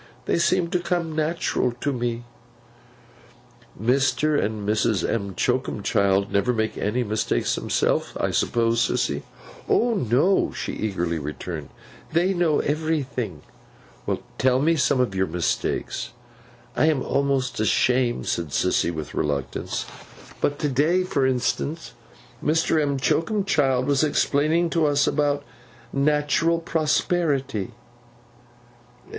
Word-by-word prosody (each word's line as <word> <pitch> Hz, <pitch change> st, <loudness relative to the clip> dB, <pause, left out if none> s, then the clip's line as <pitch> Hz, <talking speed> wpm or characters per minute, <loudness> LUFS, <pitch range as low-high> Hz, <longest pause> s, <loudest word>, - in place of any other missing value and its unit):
They -, -, +1 dB
seem 175 Hz, 0 st, +2 dB
to 180 Hz, -, +1 dB
come 170 Hz, -2 st, -2 dB
natural 155 Hz, -5 st, 0 dB
to 140 Hz, +4 st, -2 dB
me.' 120 Hz, -1 st, -2 dB, 1.6 s
'Mr. 140 Hz, +6 st, +2 dB
and 105 Hz, 0 st, -3 dB
Mrs. 110 Hz, -3 st, +1 dB
M'Choakumchild 100 Hz, -2 st, 0 dB
never 100 Hz, +5 st, +2 dB
make 110 Hz, -1 st, -1 dB
any 115 Hz, +5 st, -1 dB
mistakes 105 Hz, -, 0 dB
themselves, -, -, 0 dB
I -, -, 0 dB
suppose, 115 Hz, 0 st, +1 dB
Sissy?' -, -, 0 dB, 0.5 s
'O 240 Hz, 0 st, +3 dB
no!' 170 Hz, -, +2 dB
she -, -, -4 dB
eagerly 85 Hz, -6 st, -2 dB
returned. 75 Hz, +1 st, -6 dB, 0.4 s
'They 175 Hz, +4 st, +2 dB
know 175 Hz, -4 st, +2 dB
everything.' 140 Hz, -, -2 dB, 1.0 s
'Tell 130 Hz, 0 st, +3 dB
me 165 Hz, +4 st, +3 dB
some 140 Hz, -3 st, +2 dB
of 125 Hz, -6 st, +1 dB
your 95 Hz, 0 st, 0 dB
mistakes.' 85 Hz, +1 st, -2 dB, 0.6 s
'I -, -, +3 dB
am 150 Hz, -4 st, +2 dB
almost 135 Hz, -3 st, 0 dB
ashamed,' 120 Hz, +3 st, +2 dB
said 85 Hz, -1 st, -1 dB
Sissy, 70 Hz, +4 st, +1 dB
with 80 Hz, -3 st, -5 dB
reluctance. 70 Hz, -3 st, -2 dB, 0.6 s
'But 145 Hz, -, +1 dB
to 150 Hz, -, -1 dB
day, 155 Hz, +8 st, +2 dB
for 140 Hz, -7 st, +1 dB
instance, 135 Hz, +5 st, -2 dB, 0.5 s
Mr. 160 Hz, 0 st, +2 dB
M'Choakumchild 140 Hz, -, +1 dB
was 140 Hz, 0 st, +2 dB
explaining 155 Hz, +3 st, +2 dB
to 160 Hz, -2 st, +2 dB
us 145 Hz, 0 st, +3 dB
about 145 Hz, -1 st, +1 dB, 0.5 s
Natural 150 Hz, +4 st, +2 dB
Prosperity. 150 Hz, -, 0 dB
135 Hz, 115 wpm, -24 LUFS, 110-155 Hz, 1.6 s, O